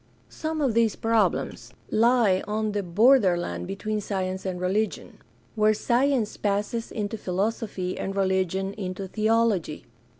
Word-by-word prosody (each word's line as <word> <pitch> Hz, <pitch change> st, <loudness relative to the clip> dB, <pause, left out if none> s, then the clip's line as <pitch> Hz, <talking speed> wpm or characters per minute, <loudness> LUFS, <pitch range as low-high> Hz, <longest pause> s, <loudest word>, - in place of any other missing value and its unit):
Some 315 Hz, 0 st, -4 dB
of 265 Hz, -5 st, +2 dB
these 230 Hz, -1 st, +2 dB
problems 225 Hz, -1 st, 0 dB, 0.2 s
lie 225 Hz, -4 st, +3 dB
on 215 Hz, 0 st, -1 dB
the 205 Hz, 0 st, -1 dB
borderland 190 Hz, -2 st, +3 dB
between 210 Hz, +2 st, -3 dB
science 190 Hz, -1 st, -3 dB
and 180 Hz, -1 st, -3 dB
religion, 200 Hz, +4 st, -2 dB, 0.3 s
where 215 Hz, -1 st, +3 dB
science 245 Hz, 0 st, +1 dB
passes 210 Hz, +3 st, -2 dB
into 210 Hz, 0 st, -3 dB
philosophy 195 Hz, -1 st, -2 dB
and 195 Hz, -, -3 dB
religion 190 Hz, 0 st, 0 dB
into 190 Hz, -1 st, -5 dB
theology. 215 Hz, -6 st, 0 dB
210 Hz, 125 wpm, -25 LUFS, 190-225 Hz, 0.3 s, lie